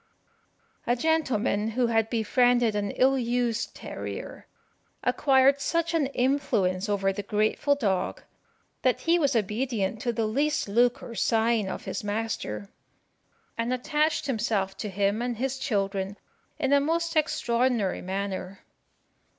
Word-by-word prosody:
A 240 - +3
gentleman 250 -7 +1
who 250 - +3
had 225 -1 +1
befriended 240 0 +2
an 205 -1 -1
ill 265 +5 +3
used 240 -2 -1
terrier - - -7 0.6
acquired 275 -1 +4
such 335 +2 0
an 310 -4 +2
influence 220 -8 0
over 195 -1 +1
the 205 - -4
grateful 215 +8 +1
dog, 195 -9 -1 0.6
that 255 -2 +1
he 340 +1 +3
was 280 -4 +1
obedient 215 -1 -1
to 240 - 0
the 230 -1 -1
least 285 +7 0
look 240 +4 +2
or 230 - -8
sign 225 -3 +1
of - - -6
his - - -4
master, 205 - -3 0.9
and 230 +2 0
attached 300 +5 0
himself 215 -7 -1
to 210 - -4
him 200 +3 0
and 240 -1 -2
his 265 +2 -2
children 200 -4 -1 0.4
in 285 -3 +1
a 285 - +6
most 330 +3 -1
extraordinary 240 -8 +1
manner. 190 0 -4
235 Hz, 135 wpm, -27 LUFS, 205-270 Hz, 0.9 s, a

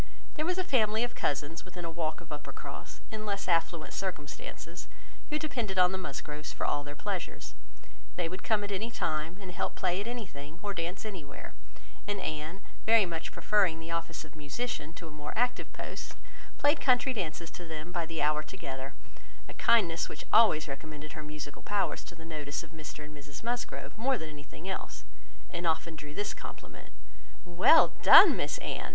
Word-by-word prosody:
There 310 +2 -1
was 360 0 +1
a 370 - +2
family 220 -7 +3
of 245 - -1
cousins 145 +3 -1
within 180 -2 -7
a 165 - -3
walk 160 -1 -2
of 165 - -14
Uppercross, 150 0 -7
in 215 -1 -4
less 200 -3 -2
affluent 165 -2 +1
circumstances, 170 -1 -5 0.4
who 300 - +1
depended 245 -11 -2
on 180 0 +7
the 190 - -2
Musgroves 150 -1 -5
for - - -2
all 145 - +1
their 145 0 -7
pleasures: 195 +1 -4 0.6
they 175 -2 0
would 185 +3 -5
come 215 -2 +2
at 205 - -3
any 205 +4 -1
time, 160 -4 -1
and 190 -3 -7
help 175 - -2
play 180 +1 +1
at 210 - -5
anything, 165 -11 -6
or 205 -1 -1
dance 175 +3 -3
anywhere; 185 -10 -7 0.5
and 205 -1 -1
Anne, 155 +3 -3 0.2
very 225 -2 +6
much 165 -2 -4
preferring 175 -1 +3
the 165 +1 -6
office 165 -1 -2
of 155 - -15
musician 155 +2 -3
to 165 0 -8
a - - -9
more 150 0 -6
active 245 +2 +1
post, - - -6 0.4
played 290 +2 +4
country 255 0 +4
dances 170 -5 -3
to 175 - -8
them 160 +1 -5
by 170 -2 -1
the 165 -2 -1
hour 150 0 +3
together; 135 -5 -6 0.5
a - - -8
kindness 180 -8 +4
which - - -7
always 210 -9 +7
recommended 150 +2 -6
her 155 - -5
musical 150 -1 -7
powers 205 -1 0
to 175 - -10
the 165 -1 -11
notice 150 -3 -3
of - - -13
Mr 155 -2 -7
and 150 0 -10
Mrs 145 +3 -9
Musgrove 240 +1 -2
more 260 +2 +3
than 160 -5 -6
anything 150 +4 -10
else, 190 - -4 0.5
and 175 -1 -1
often 165 0 +1
drew 150 0 -8
this 205 - -1
compliment;—"Well 180 - +2
done, - - +11
Miss - - 0
Anne! - - -3
170 Hz, 185 wpm, -31 LUFS, 155-205 Hz, 0.6 s, done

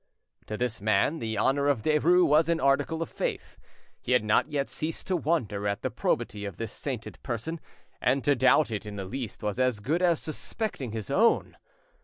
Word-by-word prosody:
To 105 - -4
this 120 -3 -2
man, 110 +9 +2
the 110 -2 -3
honour 140 +6 +2
of 135 -7 +1
Derues 165 +4 +4
was 155 +3 +4
an 170 -1 +2
article 140 +4 +1
of - - -9
faith; - - -4 0.4
he 125 - 0
had 125 - +4
not 105 +7 +2
yet 140 -2 0
ceased 155 +1 -4
to 185 - 0
wonder 130 - 0
at 100 0 -2
the - - -1
probity 105 0 -1
of 100 -3 -6
this 115 -2 -4
sainted 130 -6 -6
person, 135 +7 -4 0.4
and 130 +1 +2
to 145 - +4
doubt 130 +1 +4
it 105 0 -4
in 105 - -6
the 100 -1 -5
least 115 +3 -6
was 105 +2 -2
as 130 -4 +2
good 155 - 0
as 175 -3 +3
suspecting 155 - -4
his 110 +2 -5
own. 225 +10 +3
130 Hz, 200 wpm, -28 LUFS, 110-155 Hz, 0.4 s, Derues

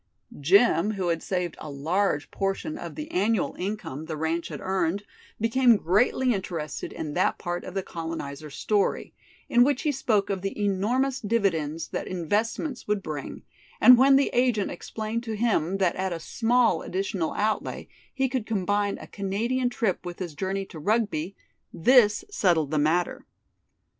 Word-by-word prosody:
Jim, 200 - +4
who 185 -3 -1
had 165 -1 0
saved 180 -3 -2
a 155 - -7
large 155 +3 -1
portion 195 +11 -2
of - - -7
the 305 0 -6
annual 205 +3 +1
income 185 -7 -4
the 155 - -5
ranch 160 +2 -1
had - - -7
earned 190 0 -1 0.4
became 230 +1 +4
greatly 240 +8 +2
interested 160 -8 -4
in 150 -2 -5
that 180 - +1
part 175 -1 -4
of 185 - -8
the 195 - -1
colonizer's 155 -4 -6
story, 205 -2 0 0.3
in 240 0 +5
which 275 0 +1
he 305 - +2
spoke 220 -7 +1
of 190 -2 -2
the 195 +2 -4
enormous 230 +7 +1
dividends 170 -8 0
that - - -4
investments 215 - -2
would 210 -2 0
bring, 150 -2 -6 0.4
and 250 - +9
when 270 +2 +6
the 275 +1 +3
agent 245 -5 +2
explained 220 +5 -4
to 225 -2 -4
him 200 -5 +1
that 185 -3 +1
at 190 0 -2
a 170 - -3
small 230 0 +2
additional 185 -3 -2
outlay 215 0 -2 0.2
he 265 -1 0
could 255 -4 -3
combine 205 -1 0
a - - -10
Canadian 230 +6 -1
trip 225 -6 -1
with 175 -1 -6
his 175 -4 -5
journey 195 +5 -2
to 165 - -10
Rugby, 200 -2 0 0.4
this 210 +2 +4
settled 170 - +2
the 155 - +1
matter. 165 +4 0
195 Hz, 165 wpm, -26 LUFS, 170-230 Hz, 0.4 s, and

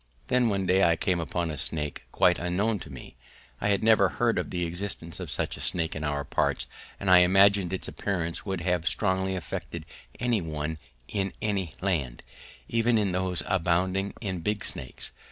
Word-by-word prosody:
Then 125 -2 +3
one 100 -2 0
day 95 +2 +4
I 85 -1 +5
came 90 +2 0
upon 85 0 -2
a 75 - -5
snake 75 +1 -2
quite 90 -1 +4
unknown 100 +5 0
to - - -9
me: 65 -3 -11 0.4
I 100 - 0
had 100 +1 +2
never 110 -4 +5
heard 115 +4 +1
of - - -3
the 90 -1 -1
existence 85 -1 -3
of - - -5
such - - -2
a - - -8
snake 80 -2 -1
in 80 - -4
our 75 -1 -1
parts, - - 0 0.3
and 100 - -5
I 90 -1 +8
imagine 95 +1 +5
its 95 - -3
appearance 85 -4 -3
would 95 -3 -3
have 90 -1 0
strongly 95 -2 0
affected 85 -5 -5 0.3
any 120 -4 +1
one 80 -1 -4 0.3
in 95 +2 -2
any 100 -6 -2
land, 75 -11 -1 0.4
even 115 0 +2
in 100 -3 +1
those 90 -3 -1
abounding 95 +2 +1
in 95 -5 -3
big 105 +4 -2
snakes. 65 - -4
90 Hz, 185 wpm, -28 LUFS, 85-100 Hz, 0.4 s, I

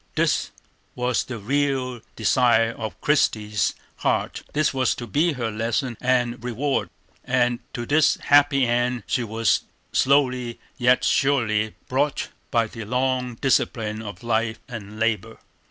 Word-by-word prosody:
This - - +1 0.5
was 125 -1 0
the 125 - -6
real 130 +1 -1
desire 115 0 +3
of 110 -1 -6
Christie's 105 - +1 0.2
heart; - - -1
this 150 -1 +1
was 130 -2 +1
to 120 - -6
be 150 - +1
her 120 -4 -3
lesson 115 +3 -1
and 125 -2 +1
reward, 125 +4 -1 0.3
and 120 -1 +1
to 120 - -4
this 150 +3 +4
happy 145 -2 +4
end 120 0 0
she 125 - 0
was 115 0 +1 0.3
slowly 130 -3 +2 0.2
yet 125 0 +3
surely 110 -6 +1
brought 140 +2 0 0.2
by 115 -3 +2
the 115 0 -8
long 125 +1 -1
discipline 110 -4 0
of 105 +2 -8
life 115 -1 0
and 110 -4 -8
labor. 115 0 -1
120 Hz, 135 wpm, -23 LUFS, 115-130 Hz, 0.5 s, this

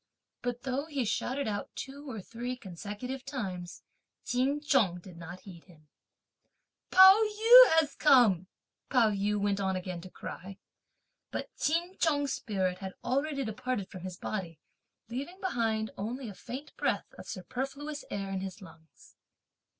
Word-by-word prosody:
But 245 0 -3
though 270 +3 -2
he 280 -6 -1
shouted 260 +5 -1
out 205 -1 -4
two 280 +1 -7
or 225 -4 -5
three 240 +5 -5
consecutive 210 +5 -6
times, 190 -11 -5 0.4
Ch'in 265 +4 +1
Chung 270 - +2
did 180 0 -13
not 170 +2 -9
heed 175 -4 -12
him. 155 -5 -20 1.0
"Pao 380 +3 +9
yü 450 +4 +8
has 295 -3 0
come!" 235 - +5 0.4
Pao 235 -5 +4
yü 205 +1 0
went 200 0 +1
on 190 -1 0
again 180 -1 -4
to 185 - -10
cry. 190 +1 -8 0.7
But - - -5
Ch'in 345 +4 0
Chung's 285 -4 +2
spirit 185 -3 -1
had 190 -1 -6
already 275 +2 0
departed 220 -2 -3
from 185 - -8
his 185 0 -6
body, 175 -6 -4 0.5
leaving 280 - -6
behind 225 - -1
only 240 +5 -4
a - - -8
faint 265 +9 -8
breath - - -1
of - - -10
superfluous 275 - -5
air 195 -1 -3
in 190 -1 -2
his 190 0 -6
lungs. 165 -4 -17
230 Hz, 150 wpm, -30 LUFS, 190-275 Hz, 1.0 s, Pao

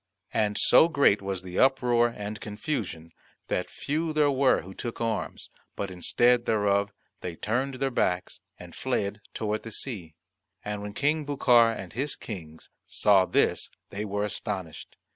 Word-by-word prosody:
And 105 -1 +1
so 160 - +6
great 140 -11 +3
was 95 -1 -4
the 90 0 -4
uproar 125 -3 +4
and 105 +3 -5
confusion, 105 - -4 0.4
that 90 - -1
few 155 +2 -2
there 150 -2 +3
were 135 -1 +3
who 95 - -10
took 120 +4 -6
arms, 115 -1 -3 0.2
but 100 -2 -4
instead 120 +7 +2
thereof 100 -2 +2 0.3
they 85 -2 -5
turned 130 +8 -1
their 135 +1 -1
backs 90 -6 -1 0.2
and - - -11
fled 100 +1 -2
toward 110 -1 -1
the 115 - -8
sea. 100 - -5 0.5
And 105 -1 -3
when 105 0 -7
King 150 +2 +1
Bucar 125 -5 +4
and 95 -6 -7
his 135 +5 -2
Kings 80 -7 -9 0.2
saw 100 -3 +4
this - - +2 0.2
they 100 +1 -4
were 105 0 -2
astonished. 95 -5 -5
105 Hz, 155 wpm, -27 LUFS, 100-130 Hz, 0.5 s, so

